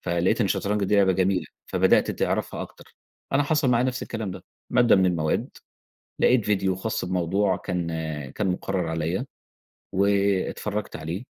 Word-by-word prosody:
فلقيت 85 +7 +1
إن - - +4
الشطرنج 100 +2 0
دي 105 +2 +2
لعبة 95 -2 +5
جميلة 95 0 +1 0.2
فبدأت - - +3
تعرفها - - -1
أكتر، - - -13 0.4
أنا 140 +1 +4
حصل 150 -2 +2
معايا 120 0 +3
نفس 130 -1 -2
الكلام 110 -4 -4
ده - - -9 0.3
مادة 120 -3 +5
من 95 -1 +4
المواد 80 -4 0 0.7
لقيت 125 -3 +4
فيديو 95 -2 +1
خاص 110 +2 -2
بموضوع 95 +2 +1
كان 90 -1 -3 0.4
كان 105 - -2
مقرّر 90 -1 -1
عليَّ 80 +7 -1 0.7
واتفرّجت 100 +1 0
عليه 85 +8 -5
95 Hz, 150 wpm, -25 LUFS, 90-105 Hz, 0.7 s, لعبة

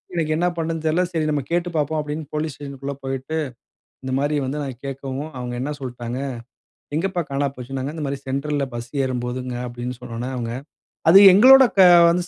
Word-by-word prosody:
எனக்கு 155 -2 0
என்ன 175 - +2
பண்றதுன்னு 165 -1 -3
தெரியல. 160 +3 +2
சரி 160 -2 -1
நாம் 145 -3 -1
கேட்டு 175 +1 0
பார்ப்போம் 155 0 0
அப்பிடின்னு 150 0 -4
போலீஸ் 155 0 -2
ஸ்டேஷ்ன்க்குள்ள 140 -1 -6
போயிட்டு 135 +3 -4 0.7
இந்தமாரி 135 +3 0
வந்து 140 +3 -3
நான் 130 -3 -6
கேக்கவும், 135 +2 -5
அவுங்க 125 -1 -5
என்ன 140 +3 -2
சொல்ட்டாங்க, 120 -1 -5 0.8
"எங்கப்பா 185 +2 -1
காணா 140 +1 0
போச்சுன்னாங்க?" 130 +3 -5
இந்தமாரி, 140 -4 -3
"சென்ட்ரல் 140 +2 -1
ல - - -1
பஸ் 120 0 -6
ஏறும் 125 -2 -2
போதுங்க" 125 0 -4
அப்பிடின்னு 125 0 -6
சொன்ன 115 - -9
உடனே, 125 +3 -4
அவுங்க, 115 -1 -3 0.6
"அது 190 - +10
எங்களோட 260 +7 +9 0.5
வந்து 175 +1 0
140 Hz, 170 wpm, -22 LUFS, 130-155 Hz, 0.8 s, அது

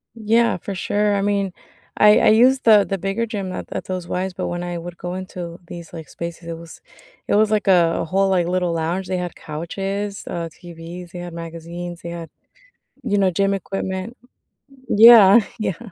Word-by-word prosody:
Yeah. 230 0 +2
For 195 +3 -6
sure, 205 +2 0
I 200 - 0
mean, 200 -1 0 0.5
I 210 0 +6
I - - +3
used 250 +5 +5
the 215 -3 +6
the 195 - -2
bigger 195 +5 -2
gym 200 -4 -5
at - - -6
at - - -4
those 185 -2 -4
Ys, 185 +1 -2
but 185 - -4
when 175 0 -4
I 175 0 -4
would 175 +1 -8
go 175 +1 -5
into 180 -2 -7
these, 170 -1 -9
like, 160 -3 -8
spaces, 170 0 -7
it 165 -1 -5
was 165 0 -12 0.5
it - - +2
was 215 +1 +3
like 215 -1 0
a 170 -3 +4
a - - -3
whole, 195 +4 +1
like, 180 -3 +1
little 180 -1 0
lounge, 170 +4 -2
they 185 0 -1
had 180 -1 -4
couches, 195 +6 -5
uh, 170 -1 -4
TVs. 170 +1 -10
They 175 - -8
had 175 -1 -7
magazines, 170 +1 -7
they 170 - -7
had, 170 -1 -7 0.7
you 205 - 0
know, 195 -2 +3
gym 195 +3 +1
equipment. 195 +3 -4 0.7
Yeah. 220 -1 +8 0.2
Yeah. 190 -6 -2
185 Hz, 195 wpm, -21 LUFS, 170-200 Hz, 0.7 s, Yeah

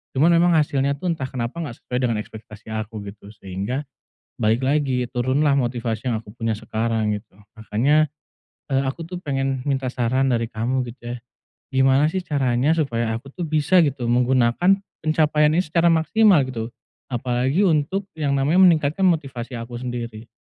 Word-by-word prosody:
cuman 150 +6 +4
memang 175 +1 +4
hasilnya 140 -2 +1
tuh 180 +5 -3
entah 140 -5 -4
kenapa 120 +4 -4
nggak 145 -8 -5
sesuai 125 - -3
dengan 115 -3 0
ekspektasi 110 0 -12
aku, 110 0 -5
gitu, 100 0 -13
sehingga 100 +6 -4 0.6
balik 115 +1 +1
lagi, 135 -3 +1
turun 130 +4 0
lah 140 -1 +3
motivasi 120 -3 -2
yang 110 -2 -1
aku 105 - -15
punya 115 -2 -1
sekarang, 110 -1 -1
gitu. 105 +1 -17 0.2
Makanya, 125 +9 +2 0.7
eee, 135 0 +3
aku 135 +5 -4
tuh 180 +1 -6
pengen 135 -3 -1
minta 135 -2 0
saran 130 +2 +1
dari 115 -2 +1
kamu 125 +4 -1
gitu, 120 0 -7
ya, - - -10 0.5
gimana 135 +2 +4
sih 190 - -1
caranya 135 0 +1
supaya 120 -8 -1
aku 120 +5 -8
tuh 175 +4 -4
bisa 155 +4 +3
gitu 140 -3 -3
menggunakan 125 +10 +3 0.2
pencapaian 155 -1 +3
ini 180 - +3
secara 170 +1 +1
maksimal, 180 +1 +4
gitu, 115 -3 -4 0.4
apalagi 125 - 0
untuk 180 +3 +1
yang 145 -3 0
namanya 145 +7 +2
meningkatkan 160 +1 +3
motivasi 135 -8 -2
aku 115 +1 -7
sendiri? 120 -2 -6
130 Hz, 165 wpm, -22 LUFS, 115-150 Hz, 0.7 s, cuman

